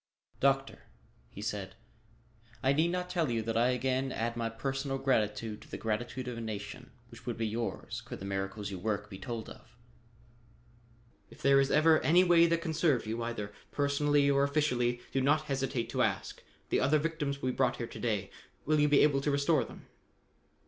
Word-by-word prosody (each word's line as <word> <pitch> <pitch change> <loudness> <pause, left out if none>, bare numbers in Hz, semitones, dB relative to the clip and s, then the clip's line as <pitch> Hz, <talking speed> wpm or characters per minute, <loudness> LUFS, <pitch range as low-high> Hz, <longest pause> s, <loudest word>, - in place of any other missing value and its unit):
"Doctor," 135 0 +1 0.4
he 100 - -9
said, 100 -3 -4 0.9
"I 135 +1 +4
need 160 +4 +3
not 180 +1 -2
tell 175 -5 0
you 115 -2 0
that 115 0 -2
I 120 +2 +4
again 130 +1 0
add 115 0 -2
my 115 -1 -1
personal 135 +3 -3
gratitude 110 -5 0
to - - -15
the - - -5
gratitude 120 +3 -3
of 120 -2 -4
a - - -5
nation 110 +3 -6 0.2
which 115 - -14
would 120 - -2
be 115 - -1
yours, 115 +2 -3
could - - -7
the 95 - -8
miracles 100 +1 -3
you 95 - -5
work 105 +1 -2
be 95 - -8
told 115 +2 -5
off. 115 -1 -14 1.5
If - - -15
there 140 0 +6
is 135 0 +2
ever 155 +1 +5
any 175 +4 +5
way 170 -2 +6
that 170 0 0
can 160 -3 -2
serve 150 -7 +2
you, 115 +2 -3
either 115 -3 -4 0.2
personally 145 0 +2
or 140 -1 +3
officially, 125 -5 +1
do 135 - +1
not 145 +4 +3
hesitate 135 -3 -2
to - - 0
ask. - - -1 0.3
The - - +2
other 140 +4 +3
victims 150 -3 -2
will 130 - +1
be - - -8
brought 130 -2 +1
here 120 - -3
to - - -10
day. 105 -5 -1 0.3
Will 155 +1 +2
you 150 0 +4
be 145 - +5
able 140 -2 +3
to 145 - 0
restore 140 0 +2
them?" - - -12
130 Hz, 195 wpm, -31 LUFS, 115-145 Hz, 1.5 s, there